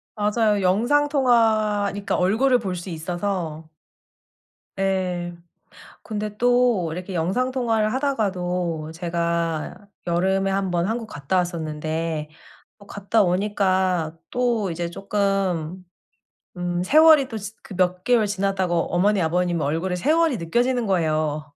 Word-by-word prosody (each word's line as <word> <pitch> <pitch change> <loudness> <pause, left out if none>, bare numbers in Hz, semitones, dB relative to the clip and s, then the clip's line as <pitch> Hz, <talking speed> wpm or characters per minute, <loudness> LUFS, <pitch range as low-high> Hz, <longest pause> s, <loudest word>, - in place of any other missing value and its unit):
맞아요. 210 0 +1
영상통화니까 220 -3 +2
얼굴을 245 +8 +3
볼 190 -4 -3
수 175 +2 -7
있어서. 170 -1 -3 1.2
예. 180 -2 -1 0.7
근데 210 -1 -5
또 245 -8 +2
이렇게 185 +2 -6
영상통화를 225 +4 0
하다가도 180 - -1
제가 170 +1 -2 0.2
여름에 190 +3 +1
한번 185 -3 0
한국 225 +1 -2
갔다 150 -1 -3
왔었는데 160 -2 -2 0.5
또 205 - -16
갔다 205 +2 +1
오니까 185 -3 0
또 235 -6 0
이제 170 +1 -4
쪼끔 190 -3 -1 0.7
음 175 0 -2
세월이 305 - +6
또 225 - -5
지 210 +2 -7
그 195 - -10
몇 180 0 +1
개월 235 -2 +3
지났다고 190 -4 -1
어머니, 195 +3 +2
아버님 175 0 0
얼굴에 165 +5 -1
세월이 315 - +2
느껴지는 240 +8 0
거예요. 155 -5 0
190 Hz, 255 characters per minute, -23 LUFS, 175-215 Hz, 1.2 s, 세월이